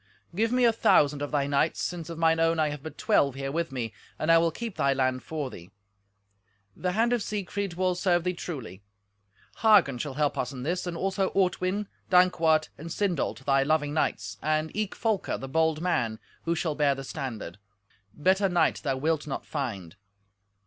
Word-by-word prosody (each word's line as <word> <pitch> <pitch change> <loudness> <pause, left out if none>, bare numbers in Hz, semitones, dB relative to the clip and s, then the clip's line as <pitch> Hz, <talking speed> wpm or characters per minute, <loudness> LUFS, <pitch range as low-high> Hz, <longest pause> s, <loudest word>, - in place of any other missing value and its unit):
"Give 220 +5 +1
me 250 0 +3
a 230 - +5
thousand 145 -9 +3
of 145 - -2
thy 145 -2 +1
knights, 140 0 +1
since 170 -3 -4
of 165 - -6
mine 165 0 +3
own 165 0 +3
I 155 -1 +2
have 145 -1 -6
but 160 - -9
twelve 140 - +2
here 135 0 -4
with 165 0 -2
me, 120 -5 -4 0.2
and 155 - +1
I 165 - +7
will 165 0 +3
keep 225 +5 -6
thy 140 0 +2
land 130 -1 0
for 150 -5 -4
thee. 85 +1 -11 1.1
The 180 -1 -2
hand 230 +4 +2
of 240 - +1
Siegfried 200 -2 -3
will 185 0 +1
serve 175 -1 +1
thee 180 0 0
truly. 130 - -7 0.8
Hagen 200 - +5
shall 140 -1 -4
help 150 0 0
us - - -1
in 130 -2 -7
this, 175 +5 -2
and 170 -1 -4
also 195 +1 0
Ortwin, 185 +1 +1 0.2
Dankwart, 165 -4 +4
and 165 +3 -7
Sindolt, 175 -8 -1
thy 135 -1 +3
loving 145 +1 +1
knights, 105 -9 -1
and 155 +1 -1
eke 215 -1 -2
Folker, 220 -4 -1
the 135 - -7
bold 160 +2 +1
man, 120 -11 0 0.3
who 170 0 +1
shall 160 -1 -1
bear 145 -2 +2
the 135 - -7
standard: 125 - -6 0.5
better 190 - +2
knight 175 -2 +2
thou 135 -3 -1
wilt 155 +2 0
not 135 - -4
find. 100 - -5
160 Hz, 190 wpm, -27 LUFS, 140-180 Hz, 1.1 s, I